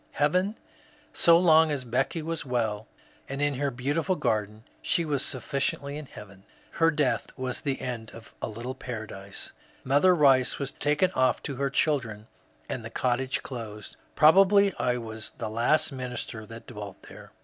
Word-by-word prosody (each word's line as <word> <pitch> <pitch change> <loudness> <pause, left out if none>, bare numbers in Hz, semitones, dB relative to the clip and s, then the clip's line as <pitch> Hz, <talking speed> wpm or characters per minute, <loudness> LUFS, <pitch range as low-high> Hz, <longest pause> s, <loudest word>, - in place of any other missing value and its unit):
Heaven? 180 +8 +1 0.6
So 170 -1 +6
long 160 -2 +5
as 140 -4 -2
Becky 135 +7 -1
was 165 0 -3
well 115 -5 -2 0.4
and 140 +1 -4
in 145 0 +1
her 140 +2 -1
beautiful 145 +8 -1
garden 105 - -1 0.2
she 170 - +1
was 145 -3 0
sufficiently 140 +2 -2
in 150 -1 -7
heaven. 100 -5 -12 0.3
Her 165 0 +3
death 150 -5 0
was 130 -1 -3
the 140 -3 -2
end 115 -3 -5
of 115 -1 -13
a - - -1
little 115 +4 -5
paradise. 110 -6 -7 0.3
Mother 145 +8 +4
Kice 135 -5 +4
was 140 -1 -3
taken 150 +5 +1
off 130 -6 +1
to 135 - -4
her 140 +1 0
children, 130 -8 0 0.4
and - - -4
the - - -6
cottage 130 +1 -1
closed. 110 -5 -7 0.2
Probably 195 +5 +6
I 125 -1 +1
was 110 -2 -7
the 110 - -4
last 120 +9 +2
minister 125 -4 -6
that 115 +2 -10
dwelt 105 -4 -9
there. - - -13
130 Hz, 160 wpm, -27 LUFS, 115-150 Hz, 0.6 s, So